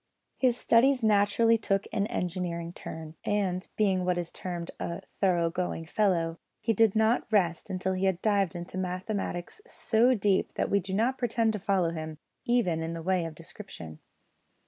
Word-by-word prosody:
His 250 -2 +3
studies 250 +2 +4
naturally 220 +2 +4
took 195 -2 0
an 200 0 +1
engineering 170 -2 -3
turn, 160 -2 -8
and, 190 -3 -1
being 195 -4 +2
what 180 0 +1
is 175 -1 -3
termed 175 -2 -5
a 170 - -4 0.2
thorough 175 -4 +2
going 175 -2 -3
fellow, 170 -3 +1 0.2
he 225 - +1
did 225 -1 +3
not 220 +2 +2
rest 180 -4 +1
until 190 0 -1
he 185 +1 0
had 190 -2 +1
dived 200 -4 +2
into 175 +2 -5
mathematics 185 - -3
so 245 - +2
deep 200 -2 +1
that - - -1
we 200 - +4
do 190 0 -4
not 240 +5 +1
pretend 230 -2 +1
to 210 - -3
follow 190 -4 +1
him, 155 -1 -6 0.3
even 220 -10 +2
in 165 +1 -3
the 165 -1 -6
way 185 -1 +1
of 165 -1 -6
description. 165 - -10
190 Hz, 170 wpm, -29 LUFS, 170-215 Hz, 0.3 s, studies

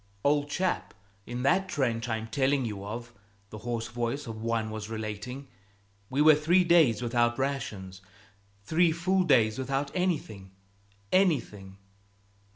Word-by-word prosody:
"Old 145 0 +2
chap, 185 +4 -2 0.3
in 120 +1 -4
that 190 +7 +2
trench 120 -5 -1
I'm 110 0 -2
telling 135 +2 +1
you 105 -3 -5
of," 120 +3 -7 0.4
the 110 - -8
hoarse 115 0 -3
voice 120 +4 -3
of 110 -2 -7
one 115 -1 -1
was 110 0 -6
relating, 110 +5 -6 0.6
"we 140 +3 +2
were 155 0 +8
three 165 +5 +3
days 160 -10 +4
without 120 0 +1
rations, 115 -9 -4 0.6
three 165 - +3
full 185 +4 +1
days 120 -8 +3
without 135 +2 -2
anything 115 - -2 0.6
anything. 115 - +1
125 Hz, 135 wpm, -28 LUFS, 110-150 Hz, 0.6 s, were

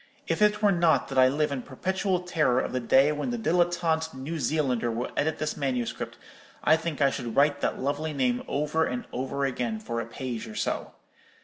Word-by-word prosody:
If - - -1
it 210 0 +3
were 205 - +6
not 170 -3 +3
that 135 -1 +1
I 130 - +7
live 150 +3 +1
in 135 -2 -2
perpetual 185 - -1
terror 155 -8 +2
of - - -2
the 130 - 0
day 135 +4 +4
when 150 - -2
the 240 - -2
dilettante 170 - +1
New 150 +5 -4
Zealander 130 -4 0
will 115 +2 -3
edit 155 +1 0
this 155 - -2
manuscript, 130 -5 -3 0.5
I 155 - +6
think 160 -2 -4
I 135 - +4
should 120 -4 -5
write 145 0 +3
that - - -1
lovely 145 +4 -1
name 130 -4 0
over 150 +3 0
and 125 -5 -2
over 135 +2 -2
again 125 -4 -2
for 115 +2 -3
a 115 - -6
page 120 -2 -5
or 110 - -9
so. - - -2
145 Hz, 205 wpm, -27 LUFS, 125-160 Hz, 0.5 s, I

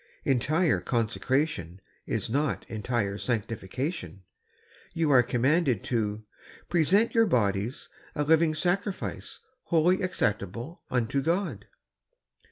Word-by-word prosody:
Entire 150 +6 +2
consecration 115 - -1 0.3
is - - -1
not 140 +5 -1
entire 105 -2 -2
sanctification. 115 - -3 0.7
You 165 -3 +2
are 130 -3 +7
commanded 130 - +1
to 110 -2 -1 0.2
" - - -21
present 180 +7 +3
your 230 -1 +4
bodies 105 - 0 0.3
a 150 - +1
living 160 +1 +3
sacrifice, 185 +4 -2 0.2
holy, 175 +2 +3
acceptable 120 - -2
unto 125 +2 0
God." 165 - -1
135 Hz, 100 wpm, -28 LUFS, 110-165 Hz, 0.7 s, are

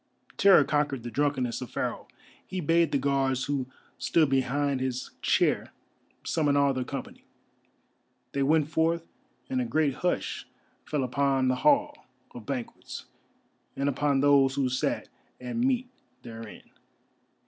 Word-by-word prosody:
Terror 195 -6 +7
conquered 140 -3 0
the 120 - -6
drunkenness 135 -4 0
of 125 - -6
Pharaoh; - - -3 0.4
he 185 - -4
bade 165 -1 +2
the 140 - +2
Guards 135 -2 +1
who 140 -3 -2 0.3
stood 155 -4 +2
behind 135 +1 +1
his 130 -1 -3
chair - - +1 0.5
summon 145 -3 +1
all 140 -1 +3
their 130 -1 -2
company. 135 +1 -7 1.1
They 140 - -1
went 150 +2 +3
forth, 165 +1 0 0.4
and 260 -1 -1
a - - -1
great 155 - +1
hush 180 +6 -2 0.4
fell 150 -2 -1
again 125 - -3
upon 135 -1 +2
the 130 - +2
Hall 295 - +2 0.2
of 120 -3 -11
Banquets 130 -4 -6 0.7
and 140 +1 -1
upon 140 0 +1
those 140 -2 +4
who 135 -2 +1
sat 130 +1 -1 0.3
at 125 -1 -6
meat 250 +1 +1 0.4
therein. 115 -2 -9
140 Hz, 140 wpm, -28 LUFS, 130-155 Hz, 1.1 s, Terror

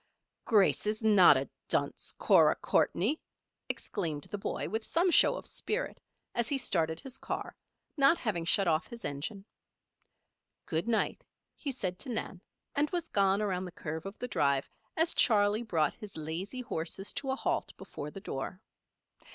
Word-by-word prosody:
"Grace 210 -2 +3
is 215 +1 -1
not 195 -9 +7
a 135 0 -2 0.2
dunce, - - 0
Cora - - +5
Courtney!" 240 - +1 0.5
exclaimed 160 -8 -3
the 205 - -2
boy, - - -3
with 220 +1 -2
some 345 +9 +2
show - - +6
of - - -7
spirit, 485 +4 -3 0.3
as 235 -1 0
he 280 - +1
started 165 -10 0
his 265 -1 -9
car, - - -4 0.4
not 280 +4 +5
having 210 - -1
shut 185 +3 +4
off 160 -1 +2
his 235 -1 -9
engine. 165 +8 -4 1.2
"Good 165 +6 -1
night," 230 -2 0 0.3
he 285 - -4
said 185 -8 -4
to 270 - -5
Nan, 205 -6 -4 0.3
and 295 +1 +2
was 345 -2 -3
gone 200 +1 +3
around 185 -2 -1
the 180 - -7
curve 160 0 -5
of 195 - -8
the 250 - -4
drive 140 - +1 0.3
as 325 +1 +2
Charley 210 -1 +4
brought 165 -10 +1
his 210 -5 -10
lazy 170 +11 -4
horses 190 -2 -4
to 280 -1 -3
a 265 - +1
halt - - -1
before 145 - -7
the 195 - -9
door. 185 +1 -5
205 Hz, 165 wpm, -31 LUFS, 165-245 Hz, 1.2 s, not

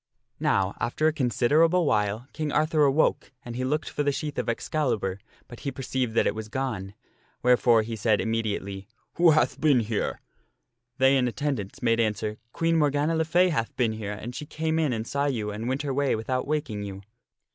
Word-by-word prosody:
Now, 100 0 +1
after 120 +7 -1
a 155 - +4
considerable 155 +6 +3
while, 105 0 0
King 155 -1 -3
Arthur 155 0 +3
awoke 140 +3 +2
and 120 -1 -6
he 130 - -2
looked 150 +4 -1
for - - -3
the 145 -1 +2
sheath 150 +1 -4
of - - -2
Excalibur, 115 -7 -1 0.3
but 120 - -11
he 140 - -3
perceived 130 -3 -3
that - - +3
it - - +1
was 110 0 -7
gone, 110 -7 -3 0.5
wherefore 120 -2 +4
he 115 +1 -5
said 110 0 +2
immediately, 100 -4 -2
" - - -44
Who 170 0 +6
hath 155 -1 +2
been 145 -6 +4
here?" 110 -1 -2 0.8
They 135 +1 +5
in 125 -1 +2
attendance 130 -2 -3
made 115 -1 +3
answer, 110 -1 -1
" 115 - -44
Queen 165 +2 +1
Morgana 150 +1 +2
le 160 0 +1
Fay 180 +3 +3
had 115 -9 -2
been 120 -3 +1
here 105 -2 -4
and 110 +4 -7
she 150 - -7
came 160 0 -1
in 155 -4 +1
and 110 -2 -2
saw 140 +3 -1
you 110 -6 -2
and 110 +3 -5
went 135 +3 -1
her 140 -2 -2
way 140 0 +1
without 130 +4 -2
waking 145 -9 -2
you." 100 -1 -7
125 Hz, 200 wpm, -26 LUFS, 110-150 Hz, 0.8 s, Who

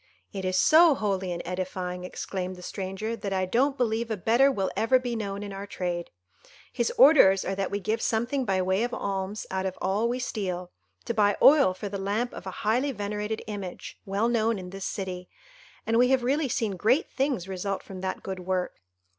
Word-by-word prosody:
"It 190 -2 -4
is 185 0 0
so 320 - +6
holy 195 -5 -1
and 170 0 -4
edifying," 180 0 -4
exclaimed 185 0 -4
the 180 - -12
stranger, 195 +5 -4
"that 200 -3 -4
I 185 -1 +1
don't 265 +8 +1
believe 230 -2 0
a 220 - -2
better 235 +9 +4
will 195 -7 -1
ever 255 +4 +4
be 245 -2 -3
known 200 -2 -4
in 200 -1 -6
our 195 +1 -6
trade. 175 -3 -3 0.6
His 240 -2 0
orders 245 -9 +7
are 195 - -1
that 195 0 -2
we 200 - -2
give 215 +3 -1
something 240 +5 0
by 190 -5 +1
way 190 +2 +1
of 245 +1 -1
alms 195 +1 -3
out 190 0 -1
of 185 - -5
all 210 +5 0
we 245 - -1
steal, 185 -8 -3 0.3
to 235 - -1
buy 205 -2 +3
oil 275 -10 +6
for 205 - -5
the 200 0 -5
lamp 210 +5 -1
of 190 - -8
a 190 +3 -7
highly 250 +6 +2
venerated 210 -1 -3
image, 200 -4 -7
well 200 +3 0
known 230 -2 +1
in 180 -1 -8
this 195 0 -6
city; 180 -2 -5 0.6
and 225 +1 +2
we 250 - +6
have 260 -1 +2
really 275 +3 +1
seen 225 -3 0
great 245 - +2
things 265 -9 -1
result 195 +1 -3
from 185 -1 -9
that 190 0 -4
good 190 -1 -5
work. 180 0 -2
200 Hz, 205 wpm, -27 LUFS, 190-235 Hz, 0.6 s, orders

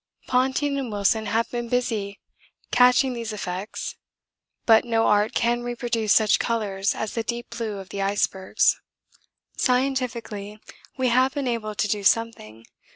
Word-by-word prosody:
Ponting 265 +3 +1
and 255 -4 -4
Wilson 210 +2 +1
have 225 +3 0
been 240 -1 -4
busy 220 -5 -1 0.5
catching 250 +1 +4
these 230 -2 -5
effects, 195 0 -5 0.7
but 225 -1 +6
no 225 -2 +1
art 210 +4 +2
can 240 0 +1
reproduce 240 -3 -2
such 215 -1 +4
colours 205 -4 -1
as 220 - -4
the 230 - -1
deep 235 +1 -5
blue 230 -3 -4
of 195 -1 -9
the 200 +2 -4
icebergs. 195 -1 +1 0.8
'Scientifically 250 -5 -1 0.4
we 260 -1 +1
have 255 +3 +2
been 280 -2 -2
able 220 -3 -2
to 210 - 0
do 205 0 -1
something. 185 - 0
230 Hz, 145 wpm, -24 LUFS, 205-245 Hz, 0.8 s, but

